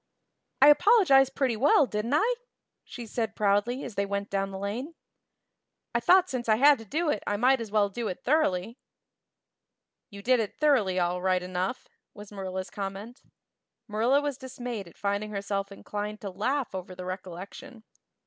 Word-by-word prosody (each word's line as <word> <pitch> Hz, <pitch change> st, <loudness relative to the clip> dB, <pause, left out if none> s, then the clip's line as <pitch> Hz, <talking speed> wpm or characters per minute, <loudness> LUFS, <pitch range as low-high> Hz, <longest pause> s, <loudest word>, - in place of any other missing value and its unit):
"I 290 Hz, -, +9 dB
apologized 295 Hz, -, +5 dB
pretty 260 Hz, -4 st, +1 dB
well, 280 Hz, +5 st, +4 dB
didn't 225 Hz, +3 st, -2 dB
I?" 450 Hz, +10 st, +3 dB, 0.5 s
she 240 Hz, -, -9 dB
said 225 Hz, 0 st, -3 dB
proudly 210 Hz, +5 st, +1 dB
as -, -, -7 dB
they 200 Hz, 0 st, -1 dB
went 200 Hz, 0 st, -3 dB
down 195 Hz, 0 st, -1 dB
the 195 Hz, -, -7 dB
lane. 230 Hz, -, -5 dB, 1.0 s
"I 235 Hz, -, +2 dB
thought 365 Hz, +9 st, +5 dB
since 245 Hz, -6 st, -4 dB
I 215 Hz, -, +6 dB
had 280 Hz, +3 st, +5 dB
to 225 Hz, -, -10 dB
do 310 Hz, -, 0 dB
it 210 Hz, -, -2 dB
I 205 Hz, -, 0 dB
might 255 Hz, +3 st, +3 dB
as 225 Hz, -, -6 dB
well 205 Hz, -1 st, +2 dB
do 220 Hz, +3 st, -4 dB
it 180 Hz, -, -6 dB
thoroughly." 235 Hz, -, 0 dB, 1.3 s
"You 200 Hz, -3 st, -11 dB
did 255 Hz, +1 st, +3 dB
it 215 Hz, -3 st, -3 dB
thoroughly, 250 Hz, -12 st, +2 dB
all 180 Hz, 0 st, 0 dB
right 185 Hz, -1 st, +1 dB
enough," 185 Hz, +6 st, -3 dB, 0.3 s
was 205 Hz, 0 st, -11 dB
Marilla's 190 Hz, -1 st, -5 dB
comment. 200 Hz, +5 st, -6 dB, 0.7 s
Marilla 235 Hz, +6 st, +2 dB
was 290 Hz, -3 st, -3 dB
dismayed 245 Hz, -6 st, -6 dB
at 170 Hz, -, -17 dB
finding 200 Hz, +1 st, -2 dB
herself 200 Hz, -1 st, -3 dB
inclined 210 Hz, +1 st, -6 dB
to 200 Hz, -, -5 dB
laugh 255 Hz, +8 st, -2 dB
over 185 Hz, -1 st, -6 dB
the 180 Hz, 0 st, -8 dB
recollection. 185 Hz, +5 st, -8 dB
215 Hz, 170 wpm, -27 LUFS, 195-260 Hz, 1.3 s, I